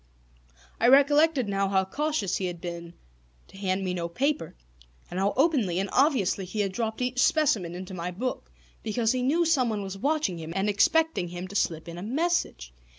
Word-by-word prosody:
I 235 - +3
recollected 285 0 +5
now 195 0 0
how 190 -1 +2
cautious 285 - -1
he 185 - -2
had 175 -1 -6
been 170 -1 -7 0.5
to - - -14
hand 190 -1 -1
me 185 -1 -2
no 170 -1 -3
paper, 280 - -1 0.6
and 180 - -3
how 195 +1 +2
openly 260 - +2
and 195 +1 -2
obviously 255 - +2
he 195 +4 -3
had 195 -2 -1
dropped 220 +3 -3
each 250 0 -2
specimen 220 - +2
into 185 +1 -7
my 175 -1 -4
book; 240 +8 -4 0.3
because 225 +1 0
he 255 -1 -1
knew 315 +7 +2
someone 250 -10 +1
was 195 0 -6
watching 285 - 0
him 160 +1 -7
and 195 +1 0
expecting 265 - +2
him 175 +1 -6
to 200 - -10
slip 165 -4 -1
in 170 +1 -7
a - - -7
message. 235 - -1
200 Hz, 190 wpm, -27 LUFS, 180-270 Hz, 0.6 s, recollected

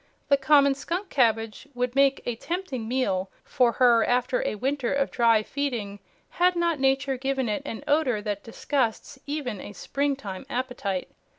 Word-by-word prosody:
The 280 - +7
common 280 0 +5
skunk 350 +8 -4
cabbage 225 -2 +1
would 250 0 -1
make 275 0 +3
a 240 - -2
tempting 285 -5 -4
meal 200 -7 0
for 245 -2 +2
her 240 -3 +5
after 250 - +1
a 215 - -2
winter 260 +2 -1
of 280 0 0
dry 230 -3 +4
feeding, 230 -8 -3 0.3
had 360 +1 +2
not 340 -3 +1
Nature 270 0 +1
given 270 -1 -1
it 210 +4 -1
an 225 - -6
odor 290 -7 +2
that 205 -1 -3
disgusts 255 +3 -2
even 280 -9 -3
a 205 - -9
spring 280 +5 -1
time 200 -2 -8
appetite. 245 -8 -3
260 Hz, 165 wpm, -26 LUFS, 225-280 Hz, 0.3 s, The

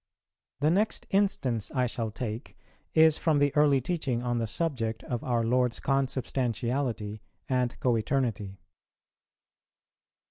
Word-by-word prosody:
_ - - -65
The 150 +2 +4
next 210 +5 +1
instance 135 - +1
I 125 -2 +1
shall 115 -2 -2
take 110 +2 -6 0.4
is 160 -1 +6
from 160 -3 +2
the 145 0 +2
early 145 -2 +5
teaching 130 -4 -2
on 120 -1 0
the 115 - -1
subject 115 -3 -2
of 120 -2 -4
our 120 -2 +1
Lord's 125 +1 +1
Consubstantiality 125 -4 -1 0.3
and 125 -2 0
Co 125 -2 +2
eternity. 110 -5 -1
125 Hz, 130 wpm, -28 LUFS, 115-145 Hz, 0.4 s, is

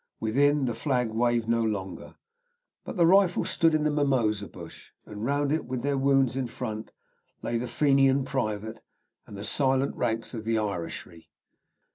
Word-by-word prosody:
Within, 140 +5 +2
the 120 - -1
flag 125 -3 -1
waved 120 0 +1
no 115 0 +2
longer, 100 -5 -4 0.7
but - - -7
the 170 - +5
rifle 185 0 +4
stood 165 -1 +2
in 155 - +1
the 150 - +2
mimosa 120 -9 +1
bush, - - -12 0.2
and 105 0 -8
round 140 +3 0
it, 155 +1 0
with 125 -1 -4
their 140 0 +1
wounds 135 -2 +2
in 130 -2 -1
front, 110 -2 -5 0.5
lay 115 - -1
the 125 - -3
Fenian 135 -1 +3
private 110 -4 -3 0.5
and 100 - -9
the 100 - -6
silent 135 +3 +1
ranks 115 +2 -2
of 110 -2 -5
the 115 +1 0
Irishry. 85 -5 -5
125 Hz, 165 wpm, -27 LUFS, 110-140 Hz, 0.7 s, the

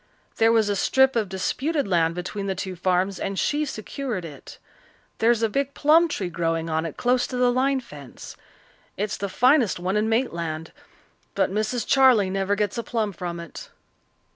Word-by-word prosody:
There 225 0 +4
was 225 -2 +3
a 205 - 0
strip 265 +6 +3
of 215 -4 0
disputed 270 - -1
land 165 -3 +1
between 195 +3 -4
the 190 - -1
two 185 0 -5
farms, 185 +2 0
and 195 0 -3
she 300 +7 0
secured 225 - -5
it. 145 -4 -11 0.6
There's 230 0 +3
a - - +4
big 275 +5 -2
plum 320 +3 +5
tree 190 - -4
growing 165 -1 -1
on 160 +1 0
it 155 - -9
close 250 0 +1
to 255 - -5
the 250 0 +3
line 265 +2 +1
fence. 145 - -11 0.6
It's 210 +1 -2
the 200 - -4
finest 250 -1 +3
one 185 +3 -2
in 215 +1 +1
Maitland. 170 -9 -2 0.6
But - - +1
Mrs. 215 +3 -1
Charley 250 -8 +4
never 195 +1 0
gets 210 +2 -1
a - - -3
plum 220 -4 -2
from 175 -1 -5
it." 170 -2 -9
205 Hz, 180 wpm, -24 LUFS, 180-250 Hz, 0.6 s, plum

